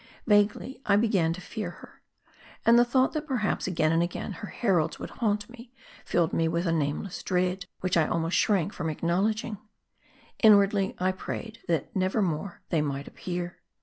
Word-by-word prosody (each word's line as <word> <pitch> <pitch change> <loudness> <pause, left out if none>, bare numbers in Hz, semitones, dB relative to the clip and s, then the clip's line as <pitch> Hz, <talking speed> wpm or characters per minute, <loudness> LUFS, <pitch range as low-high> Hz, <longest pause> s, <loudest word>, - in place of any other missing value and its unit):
Vaguely 210 +5 +2
I 200 - +3
began 200 -6 +2
to 180 - -8
fear 210 -1 -5
her. 175 - -14 0.6
And 235 +1 +7
the - - +7
thought, 255 +2 +2
that 310 -1 -3
perhaps 240 -10 -1
again 160 -4 +1
and 165 +1 +3
again, 175 +4 -3
her 200 +3 -7
heralds 175 -9 0
would - - -7
haunt 210 -3 -1
me, 240 0 -13 0.3
filled 170 -2 +1
me 165 - +2
with 170 +2 -1
a 170 - +1
nameless 160 +4 -2
dread, 180 0 -1
which 185 -1 0
I 160 -3 +3
almost 165 0 0
shrank 200 -2 +2
from 165 -3 -3
acknowledging. 200 +7 -1 0.8
Inwardly 200 -2 +5
I 185 +1 +1
prayed, 220 +4 -6
that 165 -5 -1
never 190 +3 +1
more 175 +1 -3
they 160 - +2
might 140 -1 -3
appear. 175 -1 -5
185 Hz, 175 wpm, -27 LUFS, 170-215 Hz, 0.8 s, And